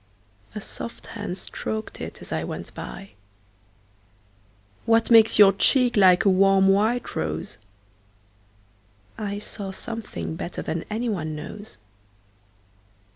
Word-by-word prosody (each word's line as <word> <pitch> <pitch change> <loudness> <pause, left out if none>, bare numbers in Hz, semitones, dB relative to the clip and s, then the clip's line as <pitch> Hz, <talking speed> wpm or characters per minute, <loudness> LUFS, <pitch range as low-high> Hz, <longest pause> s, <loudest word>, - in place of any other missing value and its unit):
A 210 - -4
soft 235 - -8
hand 205 -4 -5
strok'd 220 +2 -5
it - - -7
as - - -9
I - - -1
went - - -6
by. 195 0 -8 1.8
What 230 +1 +3
makes 225 -1 +7
your 200 -2 +8
cheek 250 +5 +3
like 190 0 +5
a - - +6
warm 195 0 +4
white 220 +5 +1
rose?I 100 - -9
saw 205 -1 -6
something 215 -3 -6
better 170 - -5
than 165 0 -3
any 225 +3 -2
one 155 -8 -2
knows. 205 +8 -9
195 Hz, 115 wpm, -24 LUFS, -, 1.8 s, your